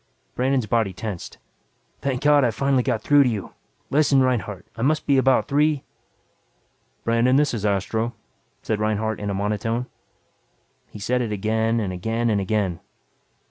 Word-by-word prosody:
Brandon's 130 Hz, -1 st, +1 dB
body 110 Hz, -3 st, 0 dB
tensed. 100 Hz, -2 st, -6 dB, 0.6 s
"Thank 135 Hz, -1 st, -2 dB
God 145 Hz, -1 st, +5 dB
I 125 Hz, -, +3 dB
finally 135 Hz, +3 st, +1 dB
got 110 Hz, -2 st, -1 dB
through 145 Hz, -1 st, +5 dB
to 130 Hz, -, +4 dB
you. 105 Hz, -5 st, -5 dB, 0.4 s
Listen, 145 Hz, -1 st, +4 dB
Reinhardt, 105 Hz, -7 st, 0 dB
I 115 Hz, -, -6 dB
must 155 Hz, +5 st, +1 dB
be 140 Hz, -2 st, +4 dB
about 130 Hz, 0 st, +3 dB
three 150 Hz, 0 st, +2 dB, 0.6 s
" -, -, -43 dB
"Brandon, 115 Hz, +3 st, +3 dB
this 145 Hz, -1 st, +3 dB
is 105 Hz, -3 st, -1 dB
Astro," 110 Hz, +4 st, -1 dB, 0.5 s
said 110 Hz, -2 st, -1 dB
Reinhardt 110 Hz, 0 st, -1 dB
in 105 Hz, -, -3 dB
a 100 Hz, -, -2 dB
monotone. 105 Hz, +4 st, -1 dB, 1.0 s
He -, -, -10 dB
said 125 Hz, +5 st, 0 dB
it 115 Hz, -3 st, -2 dB
again 110 Hz, +3 st, 0 dB
and 95 Hz, -4 st, -2 dB
again 115 Hz, +5 st, -1 dB
and 100 Hz, -2 st, +1 dB
again. 95 Hz, -3 st, -1 dB
115 Hz, 160 wpm, -23 LUFS, 105-130 Hz, 1.0 s, God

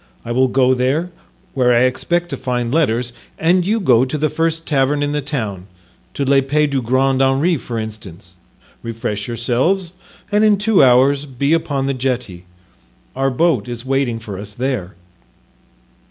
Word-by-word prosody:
I 115 Hz, -, -5 dB
will 130 Hz, +2 st, +3 dB
go 130 Hz, 0 st, +3 dB
there, 135 Hz, +8 st, 0 dB, 0.4 s
where 125 Hz, -3 st, +3 dB
I 120 Hz, -, +4 dB
expect 170 Hz, +7 st, 0 dB
to 140 Hz, -, -3 dB
find 125 Hz, -2 st, -2 dB
letters, 125 Hz, -6 st, +1 dB, 0.2 s
and 175 Hz, +2 st, +2 dB
you 215 Hz, +5 st, 0 dB
go 125 Hz, -, +4 dB
to 135 Hz, +4 st, -2 dB
the 155 Hz, 0 st, 0 dB
first 165 Hz, 0 st, -1 dB
tavern 145 Hz, 0 st, +1 dB
in 145 Hz, -, -1 dB
the 150 Hz, 0 st, -1 dB
town, 110 Hz, -, -4 dB, 0.5 s
to 140 Hz, -, -1 dB
L'Epee 140 Hz, +2 st, +2 dB
du 140 Hz, -2 st, -1 dB
Grand 130 Hz, +2 st, +1 dB
Henri 135 Hz, +6 st, +2 dB
for 120 Hz, -3 st, -6 dB
instance, 100 Hz, -5 st, -8 dB, 0.5 s
refresh 110 Hz, -3 st, -4 dB
yourselves, 130 Hz, -, 0 dB, 0.4 s
and 210 Hz, +1 st, +3 dB
in 210 Hz, -2 st, +4 dB
two 210 Hz, -4 st, +3 dB
hours 135 Hz, +3 st, +4 dB
be 140 Hz, +3 st, 0 dB
upon 155 Hz, -5 st, 0 dB
the 140 Hz, -, 0 dB
jetty; 125 Hz, -9 st, -3 dB, 0.7 s
our 135 Hz, +1 st, +1 dB
boat 160 Hz, +1 st, +1 dB
is 120 Hz, 0 st, -7 dB
waiting 135 Hz, -3 st, 0 dB
for 105 Hz, -4 st, -8 dB
us 100 Hz, 0 st, -9 dB
there." 120 Hz, -9 st, -3 dB
135 Hz, 165 wpm, -18 LUFS, 120-150 Hz, 0.7 s, I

